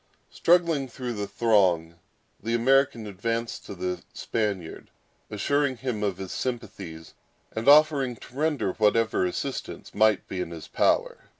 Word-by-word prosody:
Struggling 165 -5 +3
through 125 0 -5
the 105 -2 -4
throng, 95 -7 +2 0.5
the 115 +3 -1
American 135 -1 +3
advanced 115 +4 -3
to 100 - -7
the 90 0 -3
Spaniard, 100 -7 -3 0.4
assuring 130 +5 0
him 120 -3 -3
of 100 -3 -1
his 95 -1 -6
sympathies, 100 -10 -5 0.4
and 110 +3 -3
offering 145 -4 +5
to 120 - -15
render 150 -8 0
whatever 110 -2 +2
assistance 90 - -5
might 110 -1 +3
be 95 - -4
in - - -4
his 85 -2 -9
power. - - +1
115 Hz, 135 wpm, -26 LUFS, 95-130 Hz, 0.5 s, offering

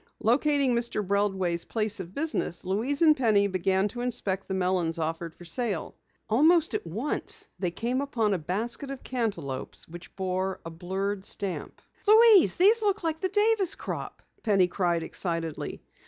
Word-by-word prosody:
Locating 275 +3 +2
Mr. 235 -3 -1
Breldway's 190 -3 0
place 215 -1 -1
of 185 0 -8
business, 290 - -2
Louise 235 - 0
and 310 -2 +6
Penny 220 -6 +3
began 190 +1 +1
to 240 +3 -6
inspect 205 -6 -2
the 190 - -2
melons 180 -3 0
offered 165 +1 -3
for 175 - -13
sale. 200 0 -2 0.3
Almost 315 +8 +4
at - - -3
once 300 - -2
they 180 - 0
came 240 +9 -2
upon 230 -7 0
a 185 - -1
basket 220 - -2
of 275 -1 -7
cantaloupes 195 - -3
which 175 +1 -12
bore 190 0 -2
a 165 - -6
blurred 190 +4 -3
stamp. 200 -2 -4 0.2
"Louise, 435 -3 +7
these 425 +6 +5
look 415 -2 0
like 320 -1 -2
the 375 - 0
Davis 415 -2 +3
crop!" - - -6 0.2
Penny 200 -5 +3
cried 175 -2 0
excitedly. 165 -2 -3
205 Hz, 155 wpm, -27 LUFS, 180-280 Hz, 0.3 s, Louise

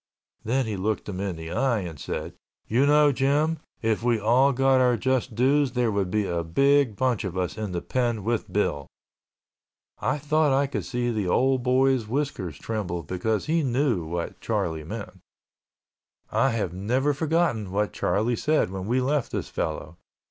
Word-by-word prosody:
Then 130 +4 0
he 105 -3 -3
looked 105 +3 -2
him 95 -3 -5
in 95 -3 -2
the 80 0 -7
eye 120 -6 +1
and 85 -5 -7
said, - - -5 0.3
"You 130 +6 +3
know, 150 0 +5
Jim, 145 +5 +1 0.2
if 110 -1 +1
we 120 -1 +2
all 125 +6 +4
got 135 0 +3
our 125 -2 +3
just 130 -3 -1
dues, 135 +2 +2
there 120 -3 +1
would 100 -3 0
be 105 +2 0
a 85 -2 -1
big 135 +7 +3
bunch 125 -2 0
of 95 -2 -4
us 90 +1 -2
in 105 -3 -4
the 85 -1 -3
pen 120 -5 -1
with 115 +1 -2
Bill." 75 -9 -1 1.1
I - - 0
thought 150 0 +2
I 140 - +2
could 140 - -4
see 120 -1 -1
the 105 -5 -1
old 130 +7 +2
boy's 130 -2 +2
whiskers 115 - -3
tremble 90 -5 -3
because 95 +7 -2
he 165 +2 +1
knew 130 - +1
what 85 +2 -5
Charlie 80 -1 -2
meant. 75 - -7 1.1
I 135 - +3
have 110 -8 -2
never 125 +10 0
forgotten 150 - 0
what 105 +1 -1
Charlie 115 +4 0
said 150 -5 +1
when 95 0 -5
we 125 +3 +1
left 140 0 0
this - - -3
fellow. 80 +1 -4
120 Hz, 175 wpm, -25 LUFS, 100-135 Hz, 1.1 s, know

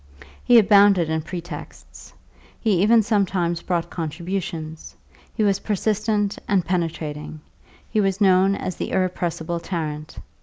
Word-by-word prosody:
He 245 -1 +6
abounded 200 -5 +5
in 160 0 0
pretexts; 170 -1 -9 0.5
he 200 -6 +1
even 220 +2 +5
sometimes 185 -5 0
brought 175 -2 -2
contributions; 165 -1 -5 0.4
he 220 - -1
was 200 -2 +2
persistent 210 0 -1
and 190 -4 +2
penetrating, 160 -4 -3 0.5
he 215 - +1
was 195 -1 0
known 190 -1 +4
as 185 - -5
the - - -3
irrepressible 175 -2 -2
Tarrant. 155 -4 -5
185 Hz, 120 wpm, -22 LUFS, 165-200 Hz, 0.5 s, He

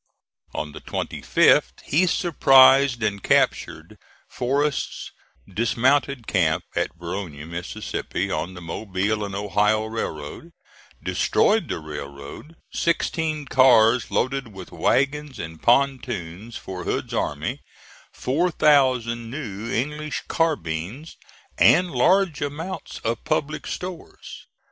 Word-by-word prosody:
On 75 - -3
the - - -10
25th - - +2
he 175 +6 +2
surprised 135 - +5
and 100 -2 -1
captured - - 0 0.3
Forrest's 140 +3 -2 0.4
dismounted 125 +5 +1
camp 85 -7 +1
at - - -1
Verona, 85 -3 -6
Mississippi, 85 +1 -4
on 80 +5 -3
the 90 - -9
Mobile 100 +4 -2
and 100 -1 -5
Ohio 105 +2 +1
Railroad, 110 - -6 0.5
destroyed - - +2
the - - -2
railroad, 75 - -9 0.2
sixteen 160 -2 -1
cars 125 -3 +5
loaded 135 0 -1
with 95 -2 -10
wagons 145 +1 0
and 80 -1 -7
pontoons 120 -6 0
for 90 -1 -7
Hood's - - -3
army, - - -2 0.5
four 160 +8 0
thousand 130 -7 +2
new 115 -5 -6
English 150 +5 -3
carbines, 120 - -2 0.4
and 180 +1 +5
large 175 +5 +2
amounts 160 +6 -5
of 115 +1 -2
public 150 +1 -2
stores. 180 -2 -8
120 Hz, 105 wpm, -23 LUFS, 95-145 Hz, 0.5 s, surprised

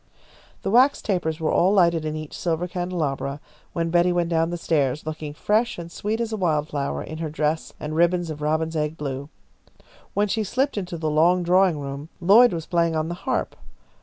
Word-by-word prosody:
The - - -1
wax 260 +5 +5
tapers 175 -5 -1
were 160 - 0
all 185 +3 +3
lighted 170 -5 +3
in 155 0 -2
each 155 -1 -7
silver 170 0 -1
candelabra 160 -6 -3 0.3
when 165 -1 -1
Betty 175 +1 +4
went 175 -1 0
down 165 -1 +1
the 175 - -3
stairs, 150 -4 0
looking 155 -1 -5
fresh 220 +8 +1
and 170 -1 -8
sweet 215 +6 -2
as 230 -1 -2
a - - -1
wildflower 150 -5 -1
in 155 +1 -7
her 160 -1 -3
dress 155 +1 -1
and 155 0 -4
ribbons 175 0 +2
of 150 -1 -7
robin's 160 +2 0
egg 150 +1 -1
blue. 140 0 -5 0.9
When 205 +1 +2
she 220 +2 0
slipped 265 +7 0
into 180 -4 -4
the 155 -1 -1
long 175 +4 +3
drawing 180 -1 +3
room, 140 +2 -6
Lloyd 205 +7 +6
was 165 -2 -4
playing 170 -1 +1
on 155 +1 -1
the - - -2 0.2
harp. - - -1
165 Hz, 195 wpm, -24 LUFS, 155-180 Hz, 0.9 s, Lloyd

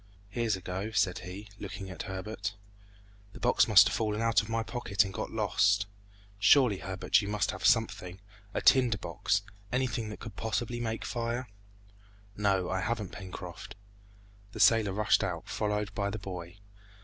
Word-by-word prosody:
"Here's 110 0 0
a 95 - -8
go!" 95 +4 -4
said 100 -4 +1
he, 95 +4 -8
looking 95 -1 -6
at 90 - -6
Herbert. 105 +3 -4 0.8
"The - - -10
box - - +3
must - - +8
have - - -1
fallen 105 -1 -1
out 115 -3 +3
of 105 - -10
my 115 0 0
pocket 105 -4 0
and 95 - -6
got - - -4
lost! 105 -1 +2 0.5
Surely, 115 -2 +5
Herbert, 95 +3 +1
you 100 - -5
must 105 0 0
have - - -8
something 100 -4 +2 0.3
a - - -2
tinder 125 -5 +5
box 100 0 -1 0.3
anything 120 -3 -1
that 105 - -8
can 110 - -7
possibly 115 +3 -2
make 115 -1 -3
fire!" 120 +1 -2 0.9
"No, 100 -3 +1
I 95 - -1
haven't, 110 -3 -2
Pencroft." 95 -3 -8 0.8
The - - -7
sailor 110 -4 +5
rushed 105 +1 +3
out, 90 -4 -3
followed 105 0 -2
by 100 -1 -1
the 105 - -4
boy. 90 -3 -7
105 Hz, 165 wpm, -30 LUFS, 95-115 Hz, 0.9 s, must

